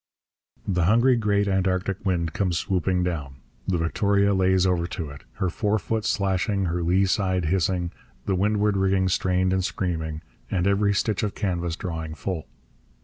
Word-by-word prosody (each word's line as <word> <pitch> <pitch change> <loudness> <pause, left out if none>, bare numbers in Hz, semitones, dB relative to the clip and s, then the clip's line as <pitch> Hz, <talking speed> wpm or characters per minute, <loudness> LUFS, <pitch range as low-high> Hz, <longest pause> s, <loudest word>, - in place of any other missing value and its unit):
The 90 -4 +1
hungry 120 +6 +4
great 100 -3 +1
Antarctic 95 0 0
wind 85 -4 0
comes 90 -4 0
swooping 90 0 0
down. 75 -7 -3 0.3
The 90 - +1
Victoria 100 +4 +2
lays 95 -1 +3
over 90 -2 +1
to 80 -4 -5
it, 70 -2 -12
her 95 -2 -1
forefoot 110 +2 -1
slashing, 100 0 0
her 85 0 -1
lee 90 +3 +3
side 95 -2 0
hissing, 90 +1 0 0.3
the 95 - 0
windward 105 +2 +1
rigging 95 -1 +2
strained 95 0 +1
and 95 0 +1
screaming, 80 -4 -3 0.3
and 90 -2 0
every 100 +1 +2
stitch 105 +1 0
of 105 -2 -2
canvas 85 -4 -2
drawing 80 -3 -5
full. 85 -1 -4
95 Hz, 155 wpm, -25 LUFS, 85-100 Hz, 0.3 s, hungry